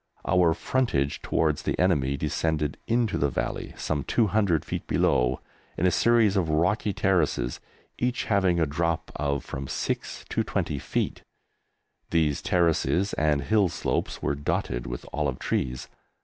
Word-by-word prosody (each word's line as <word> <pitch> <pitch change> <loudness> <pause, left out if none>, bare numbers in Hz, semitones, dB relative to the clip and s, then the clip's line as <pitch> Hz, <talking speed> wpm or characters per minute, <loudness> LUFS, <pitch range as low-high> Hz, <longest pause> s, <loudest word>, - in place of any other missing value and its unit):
Our 90 -3 +4
frontage 80 - 0
towards 75 -3 +1
the - - -2
enemy 70 -7 +2
descended 75 0 -1
into 115 -2 +1
the 70 - +2
valley, - - -3
some 75 -3 -2
200 100 - +2
feet - - -4
below, 60 +1 +2 0.4
in 90 - +1
a 90 - +4
series 115 -3 +4
of 90 -5 +1
rocky 90 +7 +1
terraces, 85 -11 +1 0.4
each 125 0 0
having 95 -4 +2
a 80 - +3
drop 85 +3 -1
of 70 -1 -1
from 65 0 -5
six - - -3
to - - 0
twenty 70 - -2
feet. - - -2 0.9
These 80 -4 +1
terraces 90 +2 +1
and 75 -2 +1
hill 105 -4 +3
slopes 80 -1 -2
were - - +1
dotted 70 -4 -2
with - - -6
olive 70 -3 -1
trees. 65 -1 -2
80 Hz, 145 wpm, -26 LUFS, 70-95 Hz, 0.9 s, Our